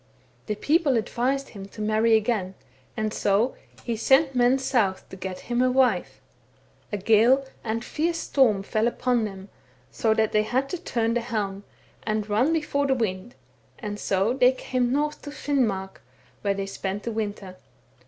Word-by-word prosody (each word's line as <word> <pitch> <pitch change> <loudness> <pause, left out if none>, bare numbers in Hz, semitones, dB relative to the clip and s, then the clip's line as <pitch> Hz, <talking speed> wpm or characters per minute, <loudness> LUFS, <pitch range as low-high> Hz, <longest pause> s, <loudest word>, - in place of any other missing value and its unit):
The 210 - -1
people 290 +1 +2
advised 260 +5 -1
him 195 -2 -9
to 200 - -15
marry 220 +1 +3
again, 215 -4 0 0.4
and 215 -1 -1
so 205 +5 +2 0.3
he 235 - -2
sent 270 +5 +3
men 250 +1 +4
south 235 -8 0
to - - -9
get 185 0 -6
him 240 0 -1
a 255 - +4
wife. 255 0 +1 0.7
A 205 - -1
gale 230 +7 +4 0.2
and 230 +1 -2
fierce 330 +2 -1
storm 230 -11 +2
fell 215 +3 0
upon 240 -1 +1
them, 195 -1 -8 0.4
so 220 -1 +1
that 220 -1 +2
they 215 - +3
had 260 +5 -1
to 360 - -4
turn 230 -9 -1
the 240 - 0
helm, 205 -4 -3 0.4
and 215 -1 -2
run 225 +9 +2
before 300 -3 0
the 265 - +2
wind, 210 -2 -3 0.4
and 210 -3 -5
so 195 +4 +1
they 255 0 +4
came 250 -1 -1
north 300 +2 -1
to 290 - -8
Finnmark, 245 -10 -1 0.4
where 200 -1 0
they 195 0 -3
spent 195 +1 -4
the 235 - -3
winter. 205 -4 -4
225 Hz, 170 wpm, -25 LUFS, 205-260 Hz, 0.7 s, men